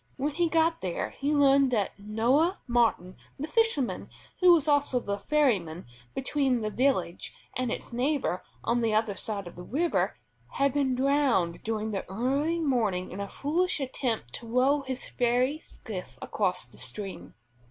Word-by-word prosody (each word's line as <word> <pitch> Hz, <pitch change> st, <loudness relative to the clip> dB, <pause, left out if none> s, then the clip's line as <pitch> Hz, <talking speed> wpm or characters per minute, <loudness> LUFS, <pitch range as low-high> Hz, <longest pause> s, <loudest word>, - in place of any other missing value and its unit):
When 285 Hz, +2 st, -1 dB
he 340 Hz, +2 st, +1 dB
got 325 Hz, 0 st, +2 dB
there 180 Hz, -2 st, -2 dB
he 290 Hz, +2 st, -1 dB
learned 275 Hz, -1 st, +5 dB
that 205 Hz, -4 st, +1 dB
Noah 240 Hz, -, +2 dB
Martin 230 Hz, -7 st, +1 dB, 0.2 s
the 285 Hz, -, -3 dB
fisherman 320 Hz, -, 0 dB, 0.3 s
who 365 Hz, -1 st, +7 dB
was 320 Hz, -4 st, +4 dB
also 285 Hz, -3 st, +3 dB
the 200 Hz, -3 st, -3 dB
ferryman 200 Hz, -, +1 dB, 0.3 s
between 265 Hz, -2 st, +1 dB
the 215 Hz, 0 st, -2 dB
village 235 Hz, -9 st, 0 dB, 0.2 s
and 250 Hz, -2 st, -1 dB
its -, -, -5 dB
neighbor 255 Hz, -6 st, 0 dB, 0.2 s
on 240 Hz, +1 st, +1 dB
the 225 Hz, -2 st, +1 dB
other 215 Hz, -1 st, +1 dB
side 200 Hz, -2 st, -3 dB
of 175 Hz, -, -9 dB
the 180 Hz, -, -9 dB
river, 320 Hz, -, 0 dB, 0.4 s
had 275 Hz, -1 st, +2 dB
been 275 Hz, -3 st, +1 dB
drowned 255 Hz, -10 st, +2 dB
during 220 Hz, -1 st, -2 dB
the 195 Hz, -3 st, -4 dB
early 275 Hz, -, 0 dB
morning 225 Hz, -, 0 dB
in 185 Hz, -, -6 dB
a 200 Hz, 0 st, -4 dB
foolish 335 Hz, +5 st, 0 dB
attempt 250 Hz, -, -2 dB
to 230 Hz, -, -7 dB
row 260 Hz, +5 st, +3 dB
his 265 Hz, -1 st, -5 dB
ferry 250 Hz, +4 st, +1 dB
skiff 200 Hz, -, -8 dB
across 185 Hz, -, -1 dB
the 120 Hz, -, -17 dB
stream. 185 Hz, +11 st, -6 dB
250 Hz, 165 wpm, -28 LUFS, 210-285 Hz, 0.4 s, who